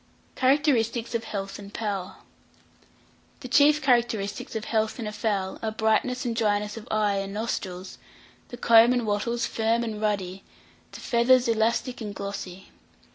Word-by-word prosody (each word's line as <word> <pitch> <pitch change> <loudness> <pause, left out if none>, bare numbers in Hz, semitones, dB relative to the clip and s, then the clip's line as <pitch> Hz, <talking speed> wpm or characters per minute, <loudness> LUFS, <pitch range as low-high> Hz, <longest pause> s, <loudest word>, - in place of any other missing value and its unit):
CHARACTERISTICS 255 -4 +1
OF 230 -1 -1
HEALTH 195 -2 -5
AND 200 0 -11
POWER. 200 -4 -3 1.3
The 255 - -6
chief 295 +3 +4
characteristics 235 -6 0
of 220 0 -3
health 220 -1 0
in 230 - -4
a 210 - -3
fowl 205 -3 -2
are 220 - -1
brightness 220 +4 0
and 235 -2 -1
dryness 210 -2 0
of 225 +1 -9
eye 210 -2 +1
and 195 0 -3
nostrils, 190 -4 -4 0.5
the 245 - -9
comb 230 +1 +6
and 245 -2 0
wattles 225 +3 -1
firm 225 +1 0
and 215 -2 -4
ruddy, 195 -3 -2 0.5
the - - -10
feathers 245 +1 +3
elastic 230 +3 0
and 205 -2 -5
glossy. 195 -2 -7
220 Hz, 150 wpm, -26 LUFS, 205-235 Hz, 1.3 s, comb